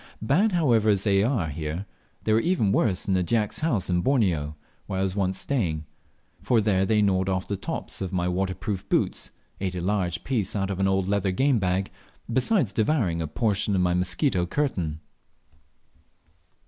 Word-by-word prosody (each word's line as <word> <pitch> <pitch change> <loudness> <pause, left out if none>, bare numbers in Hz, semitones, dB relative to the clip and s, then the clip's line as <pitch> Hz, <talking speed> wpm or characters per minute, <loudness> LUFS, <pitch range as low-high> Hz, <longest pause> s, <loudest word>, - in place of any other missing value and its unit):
Bad, 180 - +2
however, 120 -11 +3
as 100 -2 +3
they 100 -2 +3
are 105 - 0
here, 80 +5 -4 0.4
they 110 - +2
were 115 - +2
worse 100 -3 +1
in 95 - +2
a 90 - +2
Dyak's 105 +3 0
house 130 - 0
in 90 -1 +1
Borneo 85 - +1 0.3
where 95 -2 -2
I - - +1
was 95 -1 -2
once 95 -2 0
staying, 85 - -1 0.6
for 120 - +2
there 95 -3 +2
they 105 0 +3
gnawed 95 -1 +1
off 95 0 -1
the 100 - -2
tops 95 - -4
of 95 -2 -3
my 90 -1 0
waterproof 95 +1 -2
boots, - - 0 0.3
ate 95 -1 -2
a - - -2
large 90 -2 -1
piece 115 -8 -1
out 100 -1 -1
of 95 - -4
an 95 - +2
old 95 -1 +1
leather 100 -1 +1
game 130 +5 +2
bag, 95 0 -1 0.4
besides 130 - +2
devouring 105 - +1
a 80 - -2
portion 100 +3 0
of 95 - +2
my 90 -1 +2
mosquito 90 +2 +1
curtain! 85 - -2
95 Hz, 180 wpm, -25 LUFS, 90-110 Hz, 0.6 s, however